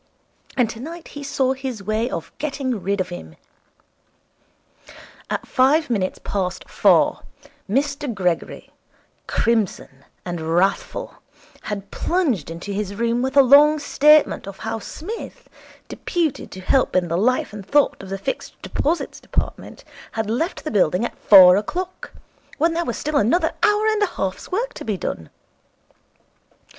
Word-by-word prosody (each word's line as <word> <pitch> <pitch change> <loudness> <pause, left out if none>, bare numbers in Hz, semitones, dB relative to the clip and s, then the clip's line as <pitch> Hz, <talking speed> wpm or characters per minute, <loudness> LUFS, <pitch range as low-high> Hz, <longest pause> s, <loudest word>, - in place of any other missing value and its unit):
And 245 -3 +4
tonight 310 +10 -8
he 290 - -8
saw 270 -2 0
his 260 -6 -6
way 215 +4 -1
of 165 - -5
getting 270 -7 -2
rid 200 +1 -1
of 185 0 -1
him. 80 - -9 1.9
At - - -3
five 275 +3 +3
minutes 190 -5 -1
past 185 -3 -3
four - - +3 0.5
Mr 280 +3 0
Gregory, 180 -5 -2 0.6
crimson 205 -11 -1 0.2
and 175 -2 -4
wrathful, 195 +3 0 0.5
had 200 -1 -5
plunged 290 - 0
into 170 +5 -6
his 200 0 -3
room 235 +2 0
with 265 +2 -1
a 275 - +9
long 290 +4 +7
statement 300 -3 +4
of 195 - -8
how 225 0 -4
Psmith, 390 - -8 0.4
deputed 320 -6 -2
to 185 - -9
help 260 +5 +1
in 180 -1 +2
the 165 - -1
life 225 +3 +1
and 210 -2 -7
thought 290 +8 +2
of 195 - -10
the 195 - -3
Fixed 195 - -5
Deposits 330 +4 -2
Department, - - -4 0.3
had 220 -1 -2
left 320 - -2
the 310 - -4
building 185 +1 +2
at - - -5
four 185 -2 +8
o'clock, 360 - -4 0.5
when 330 +2 +2
there 340 +1 -1
was - - -3
still 300 0 -1
another 250 - +2
hour 420 0 +3
and 435 -1 +2
a 410 - +4
half's 190 - -4
work 460 +7 -1
to - - -8
be 210 -4 -2
done. 80 - -5
235 Hz, 150 wpm, -22 LUFS, 195-300 Hz, 1.9 s, a